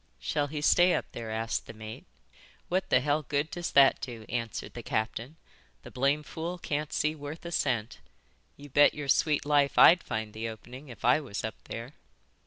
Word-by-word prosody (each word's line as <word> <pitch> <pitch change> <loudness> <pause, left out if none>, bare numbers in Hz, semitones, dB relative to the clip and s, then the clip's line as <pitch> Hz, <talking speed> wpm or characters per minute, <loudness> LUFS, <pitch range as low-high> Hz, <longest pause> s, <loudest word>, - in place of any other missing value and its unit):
"Shall 145 -1 -1
he 150 +1 -5
stay 175 +4 +5
up - - -2
there?" 115 -1 -6
asked 110 +1 -2
the - - -8
mate. 110 0 -9 0.6
"What 185 +2 0
the 125 - +4
hell 145 +3 +1
good 145 +2 -2
does 175 0 -3
that 135 -1 +6
do?" 115 -3 -7
answered 115 -1 -4
the 120 - -7
captain. 115 +6 -3 0.5
"The - - -11
blame 140 +4 +1
fool 170 +4 -5
can't 150 -3 -3
see 155 +1 0
worth 150 +2 -8
a 170 - -5
cent. 115 -8 -1 0.6
You 145 - -11
bet 145 +2 +5
your 145 -1 -5
sweet 150 +1 +2
life 145 -1 +2
I'd 175 0 +8
find 110 -1 -4
the 115 +1 -4
opening 125 +6 -11
if 120 - -8
I - - +5
was 125 -9 -6
up 110 - -6
there." 115 +5 -7
140 Hz, 195 wpm, -29 LUFS, 115-150 Hz, 0.6 s, I'd